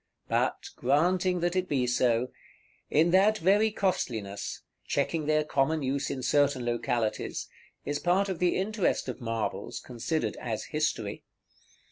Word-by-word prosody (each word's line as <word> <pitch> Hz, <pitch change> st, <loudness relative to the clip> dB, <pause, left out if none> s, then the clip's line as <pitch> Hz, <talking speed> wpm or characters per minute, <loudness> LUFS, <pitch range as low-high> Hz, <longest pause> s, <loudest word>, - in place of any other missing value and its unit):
But, -, -, 0 dB
granting 175 Hz, +7 st, +2 dB
that 175 Hz, +1 st, 0 dB
it 185 Hz, 0 st, 0 dB
be 130 Hz, -4 st, +1 dB
so, 125 Hz, 0 st, +2 dB, 0.6 s
in 160 Hz, +3 st, +4 dB
that 200 Hz, +4 st, +5 dB
very 205 Hz, +4 st, +4 dB
costliness, 110 Hz, -, -2 dB, 0.2 s
checking 160 Hz, -3 st, 0 dB
their 155 Hz, 0 st, +3 dB
common 150 Hz, +1 st, +1 dB
use 135 Hz, +1 st, -1 dB
in 130 Hz, -, -4 dB
certain 140 Hz, -2 st, +2 dB
localities, 120 Hz, -2 st, -1 dB, 0.4 s
is 145 Hz, 0 st, -1 dB
part 185 Hz, +3 st, +2 dB
of 190 Hz, -4 st, -3 dB
the 180 Hz, -1 st, +2 dB
interest 200 Hz, -4 st, 0 dB
of 125 Hz, -, -5 dB
marbles, 115 Hz, -2 st, -3 dB
considered 125 Hz, +7 st, -2 dB
as 115 Hz, -3 st, -3 dB
history. 150 Hz, -9 st, -1 dB
150 Hz, 135 wpm, -29 LUFS, 125-180 Hz, 0.6 s, that